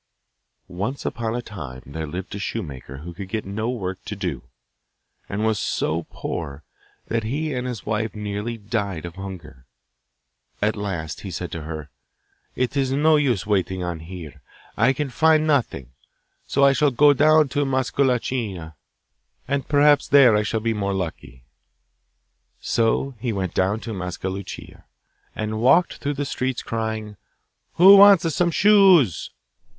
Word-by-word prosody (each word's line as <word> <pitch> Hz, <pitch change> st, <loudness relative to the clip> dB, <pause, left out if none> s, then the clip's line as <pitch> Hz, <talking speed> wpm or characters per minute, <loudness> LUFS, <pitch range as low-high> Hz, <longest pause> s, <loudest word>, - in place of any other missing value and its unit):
Once 105 Hz, +10 st, -4 dB
upon 115 Hz, 0 st, -2 dB
a 120 Hz, -, -3 dB
time 70 Hz, -, -9 dB
there 80 Hz, +3 st, -6 dB
lived 90 Hz, +5 st, -6 dB
a 100 Hz, -, -5 dB
shoemaker 70 Hz, -8 st, -6 dB
who 85 Hz, -, -7 dB
could 95 Hz, +2 st, -8 dB
get 110 Hz, +1 st, -3 dB
no 110 Hz, +4 st, -3 dB
work 95 Hz, -7 st, -4 dB
to -, -, -6 dB
do, -, -, -4 dB, 0.9 s
and 105 Hz, +2 st, -2 dB
was 110 Hz, -3 st, +1 dB
so 80 Hz, -1 st, -2 dB
poor 70 Hz, +1 st, -6 dB, 0.4 s
that 115 Hz, 0 st, -1 dB
he 145 Hz, +7 st, -2 dB
and 125 Hz, 0 st, -3 dB
his 120 Hz, -7 st, -6 dB
wife 110 Hz, +1 st, -2 dB
nearly 105 Hz, +2 st, -4 dB
died 100 Hz, -6 st, -3 dB
of 85 Hz, -, -7 dB
hunger. 90 Hz, -9 st, -10 dB, 0.9 s
At 105 Hz, +1 st, +1 dB
last 85 Hz, -8 st, -4 dB
he -, -, -7 dB
said -, -, -5 dB
to 85 Hz, -, -5 dB
her, 75 Hz, -2 st, -7 dB, 0.6 s
'It 125 Hz, +1 st, -1 dB
is 135 Hz, -2 st, 0 dB
no 155 Hz, +3 st, +4 dB
use 130 Hz, -, +1 dB
waiting 95 Hz, -3 st, 0 dB
on 85 Hz, -2 st, -4 dB
here 80 Hz, -3 st, -10 dB, 0.3 s
I 120 Hz, +4 st, +3 dB
can 135 Hz, +1 st, -3 dB
find 155 Hz, +4 st, +3 dB
nothing; 125 Hz, -, 0 dB, 0.6 s
so 140 Hz, -, +1 dB
I 140 Hz, -, +5 dB
shall 145 Hz, +1 st, +3 dB
go 145 Hz, +3 st, +5 dB
down 155 Hz, +2 st, +4 dB
to 145 Hz, +1 st, 0 dB
Mascalucia, 125 Hz, -, -1 dB, 0.7 s
and 140 Hz, 0 st, -2 dB
perhaps 145 Hz, 0 st, +4 dB
there 135 Hz, -6 st, +6 dB
I 105 Hz, -, +3 dB
shall 110 Hz, +1 st, -2 dB
be 115 Hz, 0 st, 0 dB
more 100 Hz, -2 st, -2 dB
lucky.' 80 Hz, -9 st, -6 dB, 1.2 s
So 115 Hz, +4 st, 0 dB
down 120 Hz, -, -20 dB
he 120 Hz, +1 st, -2 dB
went 95 Hz, -3 st, -3 dB
to 105 Hz, +4 st, -1 dB
Mascalucia, 95 Hz, +1 st, -6 dB, 0.5 s
and 110 Hz, 0 st, -3 dB
walked 165 Hz, +9 st, +4 dB
through 145 Hz, 0 st, -3 dB
the 145 Hz, +1 st, -2 dB
streets 130 Hz, -2 st, -3 dB
crying, 110 Hz, -2 st, -4 dB, 0.6 s
'Who 195 Hz, +3 st, +8 dB
wants 195 Hz, -5 st, +7 dB
some 175 Hz, -1 st, +2 dB
shoes? 185 Hz, -, +5 dB
110 Hz, 155 wpm, -23 LUFS, 95-135 Hz, 1.2 s, Who